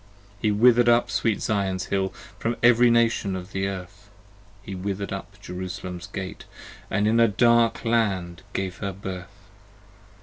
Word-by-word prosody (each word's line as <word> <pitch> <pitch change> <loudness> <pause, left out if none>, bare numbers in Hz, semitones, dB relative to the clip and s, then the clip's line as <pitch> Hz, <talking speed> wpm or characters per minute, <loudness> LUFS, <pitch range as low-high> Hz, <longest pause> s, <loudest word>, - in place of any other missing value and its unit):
He 110 - +2
wither'd 120 +3 +5
up 120 0 +3
sweet 115 -3 0
Zion's 95 -3 -1
Hill, 95 -1 +1 0.3
From 115 0 -1
every 120 0 +6
Nation 115 -4 +2
of 90 +1 -7
the 95 0 -1
Earth; 100 +1 -8 0.5
He 100 - -7
wither'd 100 +1 -4
up 100 +1 -8
Jerusalem's 90 -1 -6
Gates, 95 -2 -6 0.4
And 105 - +1
in 115 +2 +3
a 115 - +6
dark 115 +2 +3
Land 95 -7 0
gave 95 -1 -3
her 100 -1 -4
birth. 95 -2 -8
100 Hz, 145 wpm, -25 LUFS, 95-115 Hz, 0.5 s, every